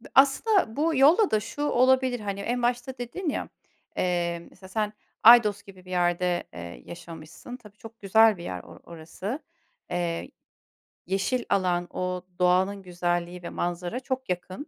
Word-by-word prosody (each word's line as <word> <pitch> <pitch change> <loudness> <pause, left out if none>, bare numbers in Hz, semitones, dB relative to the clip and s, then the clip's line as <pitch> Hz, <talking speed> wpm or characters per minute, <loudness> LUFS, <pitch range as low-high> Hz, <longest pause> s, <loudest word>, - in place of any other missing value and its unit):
Aslında 275 - +4
bu 315 +2 +1
yolla 320 +10 +5
da 215 - +3
şu 230 +7 -7
olabilir 260 -2 +3
hani 200 -2 -4
en 245 +5 -2
başta 245 +2 -1
dedin 275 +9 -4
ya. - - -3 0.5
Eee, 170 -1 -1
mesela 190 - -15
sen 210 +1 -1 0.3
Aydos 215 -3 +7
gibi 190 -2 -15
bir 185 - -11
yerde, 175 0 +1
eee, 85 -8 -8
yaşamışsın. 165 +8 -10
Tabii 210 -4 -17
çok 225 +1 -13
güzel 220 +1 +5
bir 170 - -9
yer 90 - -5
o 85 - -14
orası. 170 - -6 0.5
Eee, 175 -1 -2 0.8
yeşil 195 +7 0
alan 180 -3 +1
o 180 0 -2 0.2
doğanın 185 +2 +2
güzelliği 175 0 -2
ve - - -5
manzara 175 +6 -3
çok 260 0 -4
yakın. 185 - -4
195 Hz, 150 wpm, -26 LUFS, 175-245 Hz, 0.8 s, Aydos